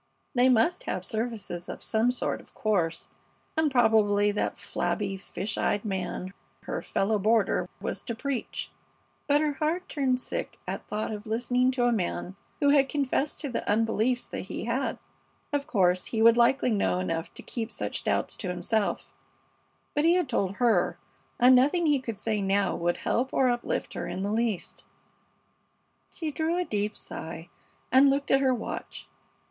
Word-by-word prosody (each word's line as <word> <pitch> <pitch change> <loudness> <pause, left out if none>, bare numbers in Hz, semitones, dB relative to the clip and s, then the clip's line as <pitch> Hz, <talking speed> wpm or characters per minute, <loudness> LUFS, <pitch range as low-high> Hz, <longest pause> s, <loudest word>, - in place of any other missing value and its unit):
They 255 0 +4
must 255 +8 +2
have 185 0 -3
services 215 -6 -4
of - - -6
some 225 +2 +2
sort, 250 - -1
of - - -21
course, 175 -6 0 0.5
and 315 -1 +3
probably 215 -5 +4
that 205 - -2
flabby, 200 0 -2
fish 195 +2 -4
eyed 205 +2 0
man, 190 -1 -3 0.3
her - - -3
fellow 210 +2 0
boarder, 215 0 +2
was - - -4
to 235 - -3
preach; 260 0 -3 0.6
but 290 0 +4
her 305 -1 +1
heart 315 +5 -1
turned 260 -3 0
sick - - -4
at - - -5
thought 215 +1 -2
of 210 0 -6
listening 245 +3 +2
to 245 -2 +1
a 245 - +4
man 190 -3 -2 0.2
who 285 - +4
had 280 -2 +4
confessed 285 +1 0
to 290 - -2
the 240 - -2
unbeliefs 225 +3 +1
that - - -6
he - - -5
had. 245 +4 -1 0.6
Of 285 -1 0
course, 180 -4 +2
he 225 - -2
would 230 +1 +7
likely 240 +2 +3
know 200 -4 +1
enough 165 -3 -2
to - - -7
keep 230 -1 -4
such - - -3
doubts - - 0
to 195 - -4
himself; 190 +4 -1 0.8
but 295 - +1
he 335 +2 +5
had 360 -5 +1
told 200 -6 0
her, 210 -8 +2 0.4
and 250 +1 +7
nothing 295 +7 +3
he 295 -3 +3
could 230 -5 -5
say 215 0 -1
now 195 0 +1
would 175 0 0
help 255 +3 0
or 260 -1 +3
uplift 240 0 -2
her - - -4
in 190 - -3
the 200 - -1
least. 220 -3 -1 1.3
She 320 -3 -4
drew 320 +3 0
a 360 - 0
deep 210 -3 -2
sigh 165 +1 -7 0.4
and 270 +2 +7
looked 280 +1 0
at 270 - +5
her 265 -1 +3
watch. 225 - -6
230 Hz, 175 wpm, -28 LUFS, 200-265 Hz, 1.3 s, would